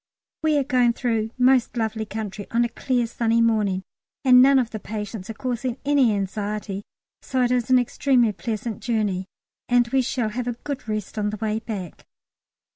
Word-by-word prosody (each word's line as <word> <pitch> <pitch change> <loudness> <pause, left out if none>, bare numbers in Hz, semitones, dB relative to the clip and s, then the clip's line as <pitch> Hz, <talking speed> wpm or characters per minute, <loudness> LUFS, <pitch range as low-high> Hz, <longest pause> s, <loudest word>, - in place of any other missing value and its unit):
We 310 -2 +2
are 285 - +2
going 250 -3 +3
through 225 -3 -1
most 255 -1 +3
lovely 220 -1 -2
country 210 -2 -5
on 235 +1 +2
a - - -3
clear 245 +1 0
sunny 230 0 +1
morning, 210 -5 +2 0.4
and 250 -1 +8
none 275 +1 +6
of 245 -3 +1
the 215 - -5
patients 210 -1 -6
are 225 - -5
causing 250 0 -3
any 280 -5 +4
anxiety, 200 0 -3 0.4
so 255 -1 0
it 245 - +1
is 250 -1 +1
an 255 - +6
extremely 245 -1 +2
pleasant 220 +1 -4
journey, 205 -6 -1 0.4
and 245 -1 +4
we 265 +2 +3
shall 245 -3 -1
have 245 +3 -4
a 245 - 0
good 285 -5 -5
rest 215 0 -3
on 210 0 0
the 215 - -4
way 215 0 -1
back. 205 -6 -7
230 Hz, 185 wpm, -24 LUFS, 215-250 Hz, 0.4 s, and